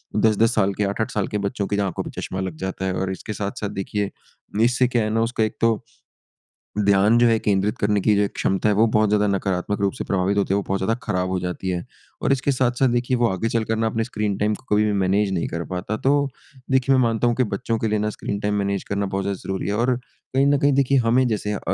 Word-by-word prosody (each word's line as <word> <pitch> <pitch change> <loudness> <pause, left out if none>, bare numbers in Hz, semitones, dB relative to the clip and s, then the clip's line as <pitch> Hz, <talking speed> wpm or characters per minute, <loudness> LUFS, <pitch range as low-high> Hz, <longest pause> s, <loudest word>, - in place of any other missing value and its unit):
10-10 110 +1 +3
साल 100 -2 +2
के 105 - -1
8-8 100 +2 -1
साल 105 -2 -1
के 105 - -2
बच्चों 100 0 -3
की 100 - -1
आँखों - - -4
पे - - -7
चश्मा 95 - -4
लग 95 -3 -3
जाता 95 0 -4
है। 95 - 0
और 95 +1 -2
इसके 95 +3 -5
साथ-साथ 100 0 -4
देखिए, 100 +1 -2 0.5
इससे 125 +1 +3
क्या 120 -2 +1
है 105 - -1
ना 115 - +2
उसका 115 -2 0
एक 110 0 -2
तो। 115 0 +2 1.0
ध्यान 100 +3 +4
जो 120 0 +5
है 115 -1 +4
केंद्रित 105 +2 0
करने 105 0 +1
की 105 +2 +3
जो 100 - +3
एक 100 - -3
क्षमता 95 +3 +1
है 105 - +2
वो 110 +3 +5
बहुत 105 -1 +4
ज़्यादा 105 0 +2
नकारात्मक 100 0 -1
रूप 100 -1 +1
से - - -5
प्रभावित 100 +1 0
होते 100 -1 +1
हुए 100 0 +1
बहुत 95 0 0
ज़्यादा 105 +4 +1
खराब 90 0 -1
हो 95 0 -1
जाती 90 +1 -4
है। 90 -1 -2 0.4
और - - +1
इसके 135 +1 +1
साथ-साथ 130 0 +2
देखिए 120 +1 +1
वो 120 0 +3
आगे 95 +2 -1
चलकर 115 -1 0
ना 110 0 +1
अपने 115 0 -1
स्क्रीन 105 -4 -2
टाइम 105 +1 +1
को - - -16
कभी 105 - +4
भी 105 - +1
मैनेज 100 +1 +2
नहीं 85 - -1
कर 85 +1 -4
पाता। 95 +4 -3
तो, 140 +2 +2 0.4
देखिए 130 +1 +3
मैं 130 - +4
मानता 115 0 +1
हूँ 120 - +2
कि 130 - +2
बच्चों 115 +1 -2
के 110 - 0
लिए 105 0 0
ना 105 +1 0
स्क्रीन 100 -1 -4
टाइम 105 0 -1
मैनेज 100 -1 -1
करना 100 0 0
बहुत 95 0 -2
ज़्यादा 100 -1 -3
ज़रूरी 95 -2 -3
है। 100 - 0
और 125 +3 +2
कहीं 130 +2 -3
न 145 0 +4
कहीं 140 +1 +3
देखिए 140 0 +3
हमें 125 +2 +4
जैसे 105 -2 -1
अ, - - -3
105 Hz, 260 wpm, -22 LUFS, 100-115 Hz, 1.0 s, जो